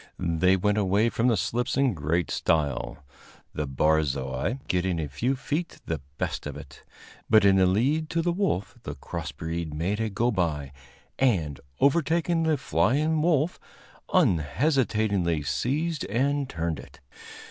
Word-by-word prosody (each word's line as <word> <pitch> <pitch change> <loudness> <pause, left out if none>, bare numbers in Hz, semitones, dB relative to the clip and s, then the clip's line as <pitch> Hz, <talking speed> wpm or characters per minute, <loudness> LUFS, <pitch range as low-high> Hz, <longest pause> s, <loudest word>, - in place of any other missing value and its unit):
They 90 +2 +2
went 105 +2 +1
away 100 +3 +2
from 115 +1 0
the 115 -4 +3
slips 120 +10 -1
in 135 -3 +3
great 80 +2 -1
style, 70 -3 -1 0.5
the 75 -1 -3
barzoi 70 - 0
getting 90 -1 0
a 75 - -2
few 120 - -1
feet 150 +5 -3
the 80 -3 -3 0.2
best - - -3
of 70 -1 -6
it; 70 -2 -12 0.5
but 110 -2 +6
in 95 -1 +6
the 95 -1 +5
lead 135 +12 +2
up - - -21
to 165 - 0
the 175 - +1
wolf 170 - -1
the - - -6
cross - - -6
breed 80 -2 -4
made 95 +7 -1
a 110 -1 0
go 115 +5 +1
by, 80 - -1 0.5
and, 85 - +1 0.2
overtaking 165 +3 +2
the 160 -2 +2
flying 150 +6 +1
wolf, 160 0 +1 0.5
unhesitatingly 105 - +1
seized 145 - -1
and 140 +4 0
turned 80 -3 -2
it. - - -13
100 Hz, 150 wpm, -26 LUFS, -, 0.5 s, but